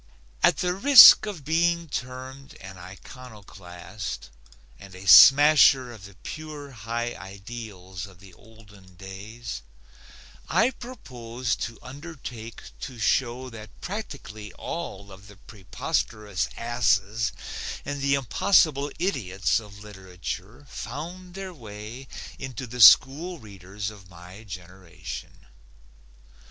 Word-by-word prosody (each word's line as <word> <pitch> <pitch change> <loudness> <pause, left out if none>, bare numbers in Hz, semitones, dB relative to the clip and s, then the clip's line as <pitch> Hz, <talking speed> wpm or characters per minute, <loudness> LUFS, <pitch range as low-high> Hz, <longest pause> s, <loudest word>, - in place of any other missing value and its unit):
At - - +4
the 180 0 0
risk 220 0 +9
of 175 -9 -7
being 170 +1 +1
termed 130 +2 -7
an 95 0 -10
iconoclast 95 - -10 0.5
and 95 -2 -13
a 95 +1 -11
smasher 135 -1 +8
of 110 -5 -12
the 100 -1 -14
pure 150 -2 -8
high 120 0 -4
ideals 95 -2 -9
of 95 -3 -18
the 95 -1 -16
olden 105 -4 -18
days, 95 - -8 0.9
I 235 +4 +3
propose 125 - -5
to 115 -1 -5
undertake 130 -5 -9 0.2
to 130 -3 -8
show 125 +2 0
that 110 -1 -12
practically 140 - -7
all 100 - -7
of 95 +1 -14
the 100 - -14
preposterous 105 0 -4
asses 115 -2 0 0.5
and 145 0 -4
the 140 0 +2
impossible 140 - +2
idiots 110 - 0
of 105 -2 -13
literature 95 +4 -8
found 175 +11 -8
their 190 -1 -7
way 110 0 -10 0.3
into 130 -1 -6
the 125 +1 -5
school 155 - +7
readers 100 - -8
of 95 -4 -16
my 90 +5 -13
generation. 90 -3 -10
115 Hz, 110 wpm, -25 LUFS, 95-140 Hz, 0.9 s, risk